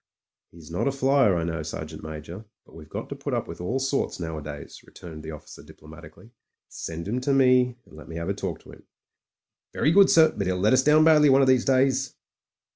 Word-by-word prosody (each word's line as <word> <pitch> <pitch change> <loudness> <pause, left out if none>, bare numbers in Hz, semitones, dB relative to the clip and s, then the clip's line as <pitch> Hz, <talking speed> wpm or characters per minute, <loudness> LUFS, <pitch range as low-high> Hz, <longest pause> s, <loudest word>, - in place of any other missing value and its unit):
"He's 85 -1 -15
not 90 - -1
a - - +2
flier, 135 -6 +2
I 85 - -2
know, 80 -1 -3
Sergeant 75 0 -7
Major, 80 +6 -9 0.2
but - - -21
we've 75 -2 -13
got - - -6
to - - -6
put - - -4
up - - -3
with - - -9
all 115 +9 -2
sorts 135 -4 -2
nowadays," 75 -3 -7
returned 80 -3 -12
the 80 - -9
officer 75 -2 -11
diplomatically. 85 +8 -15 0.4
"Send 85 +2 -7
him 120 +5 -2
to 140 - -1
me, 125 -2 +3
and - - -18
let 75 - -13
me 80 - -8
have 85 +1 -5
a 100 - 0
talk 100 - -5
to - - -15
him." - - -17 0.9
"Very 155 - +1
good, 195 +3 +6
sir; 160 -1 +5
but 100 -3 -3
'e'll 90 0 -1
let 105 +5 +2
us 130 0 +4
down 150 +2 +5
badly 155 -2 +5
one 135 +1 +5
of - - +2
these 130 -2 +3
days." 135 -1 +1
105 Hz, 220 wpm, -25 LUFS, 80-135 Hz, 0.9 s, good